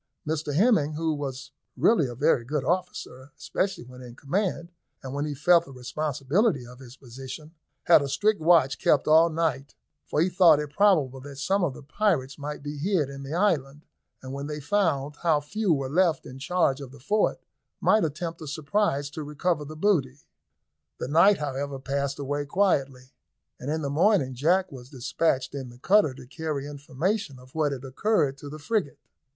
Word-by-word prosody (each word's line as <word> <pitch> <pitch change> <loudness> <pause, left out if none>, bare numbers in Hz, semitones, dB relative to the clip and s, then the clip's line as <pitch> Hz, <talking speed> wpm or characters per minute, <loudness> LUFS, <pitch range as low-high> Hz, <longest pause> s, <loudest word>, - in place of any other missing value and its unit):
Mr 150 -2 -2
Hemming, 185 -6 +3
who 160 +1 -1
was 135 -3 -6 0.3
really 160 - +3
a 120 - -7
very 140 -2 +2
good 140 +3 -2
officer, 165 -7 -3
especially 190 -2 -2
when 125 +1 -13
in 120 -1 -11
command, 170 +4 -2 0.3
and 130 0 -6
when 145 +1 -2
he 150 -1 -4
felt 170 +4 +4
the 135 - -13
responsibility 140 - -1
of 125 +1 -13
his 130 -1 -13
position, 135 +5 -10 0.3
had 170 - +6
a 140 - -3
strict 210 +5 +1
watch 160 -5 +4
kept 145 - +2
all 160 +2 +6
night, 155 -4 -2 0.3
for - - -1
he 165 - +4
thought 175 -4 +5
it 150 -1 -5
probable 145 -7 +3
that 140 +1 -10
some 190 +8 0
of 145 -7 -1
the - - -11
pirates 150 -5 -1
might 145 0 -6
be 145 0 -6
hid 160 -4 0
in 140 0 -8
the 140 +3 -5
island, 150 -7 0 0.4
and, 130 0 -7
when 140 +1 -5
they 150 0 -5
found 150 -4 0
how 160 -3 +2
few 190 +7 -1
were 135 -4 +1
left 165 +1 +1
in 130 +1 -10
charge 145 -2 +1
of 135 - -8
the 140 - -14
fort, 210 +11 +1 0.4
might 215 - +3
attempt 165 +2 -4
a 155 - -7
surprise 145 0 0
to 145 +2 -7
recover 150 +2 -1
the 155 +2 -9
booty. 150 -7 +1 0.8
The 125 - -5
night, 180 +7 +5
however, 140 -1 -3
passed 140 +1 -2
away 145 +1 -3
quietly, 140 -8 0 0.5
and 130 - -5
in 155 +1 -1
the 140 - -1
morning 160 -4 +3
Jack 175 +8 +1
was 125 -2 -11
despatched 135 0 -1
in 135 -3 -6
the 120 - -14
cutter 170 -1 +3
to 130 -1 -11
carry 150 0 -4
information 145 +4 -3
of 130 +1 -17
what 155 -2 +1
had 135 -1 -6
occurred 140 -1 0
to 145 - -8
the 150 - -8
frigate. 155 0 -2
145 Hz, 190 wpm, -26 LUFS, 135-170 Hz, 0.8 s, had